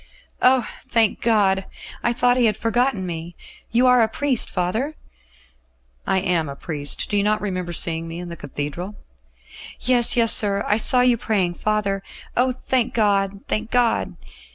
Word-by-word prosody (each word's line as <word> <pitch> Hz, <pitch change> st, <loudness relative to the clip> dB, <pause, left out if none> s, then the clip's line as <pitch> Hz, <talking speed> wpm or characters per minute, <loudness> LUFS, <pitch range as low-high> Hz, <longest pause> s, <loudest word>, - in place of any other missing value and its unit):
"Oh! 255 Hz, -2 st, +4 dB, 0.2 s
thank 225 Hz, -2 st, +1 dB
God! 195 Hz, -4 st, +2 dB, 0.4 s
I 240 Hz, -, +1 dB
thought 245 Hz, +1 st, +2 dB
He 245 Hz, -2 st, +3 dB
had 210 Hz, -1 st, 0 dB
forgotten 230 Hz, -3 st, 0 dB
me. 170 Hz, 0 st, -6 dB, 0.3 s
You 240 Hz, +2 st, +2 dB
are 250 Hz, -1 st, +5 dB
a 225 Hz, -, +3 dB
priest, 260 Hz, +2 st, 0 dB
father?" 220 Hz, -, -2 dB, 1.1 s
"I 190 Hz, -, +2 dB
am 170 Hz, -5 st, 0 dB
a 140 Hz, -, -7 dB
priest. 145 Hz, -2 st, -2 dB
Do 205 Hz, -, -1 dB
you -, -, +3 dB
not 210 Hz, +1 st, +1 dB
remember 185 Hz, -4 st, -4 dB
seeing 165 Hz, -1 st, +1 dB
me 165 Hz, +1 st, -7 dB
in 175 Hz, 0 st, -7 dB
the 170 Hz, -, -7 dB
Cathedral?" 150 Hz, +7 st, -6 dB, 0.8 s
"Yes, 245 Hz, -1 st, +3 dB
yes, 230 Hz, -1 st, +5 dB
sir; 200 Hz, -1 st, +2 dB
I 210 Hz, -, +2 dB
saw 250 Hz, +3 st, +4 dB
you 250 Hz, -1 st, +3 dB
praying, 195 Hz, -6 st, -1 dB
father. 200 Hz, +1 st, -1 dB, 0.3 s
Oh! 255 Hz, +1 st, +2 dB
thank 255 Hz, -1 st, -1 dB
God, 200 Hz, -3 st, +1 dB
thank 220 Hz, +1 st, -2 dB
God!" 245 Hz, -2 st, +1 dB
210 Hz, 165 wpm, -21 LUFS, 180-240 Hz, 1.1 s, are